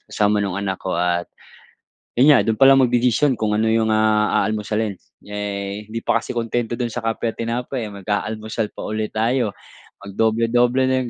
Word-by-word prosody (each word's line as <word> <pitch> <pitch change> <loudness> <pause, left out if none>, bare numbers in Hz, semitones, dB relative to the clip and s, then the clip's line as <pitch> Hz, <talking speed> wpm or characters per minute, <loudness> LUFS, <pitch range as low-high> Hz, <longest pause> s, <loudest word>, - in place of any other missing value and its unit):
Kasama 105 0 +1
nung 100 -1 -3
anak 95 -2 -3
ko 95 - -3
at 85 0 0 0.9
yun 145 +4 +7
nga, 130 - +5
dun 110 -1 -1
palang 135 0 +7
magdedesisyon 125 +1 +2
kung 105 -1 0
ano 110 +1 +1
yung, 110 -1 +2
ah, 110 0 +2
aalmusalin. 105 0 -2 0.3
Eh, 100 0 -4
hindi 115 +1 -4
pa 115 - +2
kasi - - -7
kuntento 120 0 -2
dun 120 0 -2
sa 120 - -4
kape 115 +1 -1
at - - -40
tinapay, 120 +1 -3
eh, - - -11
mag-aalmusal 105 +2 -3
pa - - -9
uli 110 0 -1
tayo. 115 -1 0 0.5
Mag-doble-doble 115 +5 +1
na 130 0 +1
yung 120 - -6
110 Hz, 180 wpm, -21 LUFS, 105-120 Hz, 0.9 s, yun